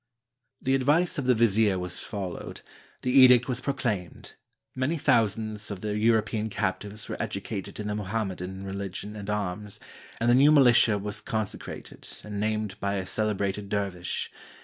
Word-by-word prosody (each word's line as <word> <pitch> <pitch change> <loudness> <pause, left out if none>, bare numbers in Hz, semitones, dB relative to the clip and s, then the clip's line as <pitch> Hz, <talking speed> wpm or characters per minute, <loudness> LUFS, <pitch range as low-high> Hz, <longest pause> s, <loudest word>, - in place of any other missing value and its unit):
] 130 +1 -53
"The 130 - +2
advice 145 +6 +2
of 135 - -2
the 125 -1 +4
vizier 110 -3 +3
was 90 -1 -3
followed; 95 -4 -6 0.4
the 125 - 0
edict 125 -2 +7
was 125 -1 -2
proclaimed; 120 - -3 0.4
many 130 +6 -1
thousands 110 -4 +1
of 100 -3 -6
the 105 -1 -2
European 110 0 +1
captives 105 0 -3
were - - -4
educated 95 - -5
in 105 - -4
the 105 - -2
Mohammedan 95 -2 -3
religion 100 +1 -5
and 105 -1 -7
arms, 105 0 -3 0.4
and 115 - 0
the 120 - +6
new 140 +4 +6
militia 120 -7 +6
was 105 +1 -3
consecrated 110 -2 -5 0.2
and 105 -1 -5
named 105 -1 -2
by 100 0 -1
a 95 -1 -2
celebrated 100 -1 -1
dervish. 95 -4 -2
105 Hz, 155 wpm, -27 LUFS, 100-120 Hz, 0.4 s, edict